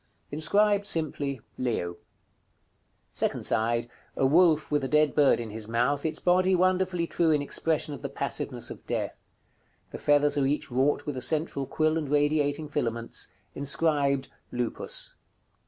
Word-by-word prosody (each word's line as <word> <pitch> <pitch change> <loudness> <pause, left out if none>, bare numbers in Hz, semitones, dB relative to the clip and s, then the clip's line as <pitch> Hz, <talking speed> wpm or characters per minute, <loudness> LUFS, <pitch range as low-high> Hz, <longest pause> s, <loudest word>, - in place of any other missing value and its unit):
Inscribed 200 +7 +2
simply, 145 - 0 0.2
"LEO." 90 -9 -2 1.2
Second - - -1
side. 115 +1 0 0.3
A 135 - +2
wolf 155 +1 +4
with 145 -1 +1
a - - 0
dead 150 +1 +3
bird 145 -4 +4
in 115 -2 -5
his 110 0 -4
mouth, 125 +6 +1
its 155 - -3
body 185 +1 +3
wonderfully 185 -1 +1
true 165 0 +1
in 150 -2 +3
expression 150 +1 -1
of 140 - -8
the - - -4
passiveness - - -3
of - - -10
death. - - -4 0.6
The - - -7
feathers 145 0 +3
are 135 - +2
each 145 -2 -2
wrought 135 +4 +1
with 145 -3 -4
a - - -3
central 140 +1 0
quill 155 +1 +1
and 150 -3 -5
radiating 145 +1 +1
filaments. 115 -6 -2 0.3
Inscribed 140 -2 0 0.2
"LUPUS." 120 -1 -2
145 Hz, 150 wpm, -27 LUFS, 135-160 Hz, 1.2 s, wolf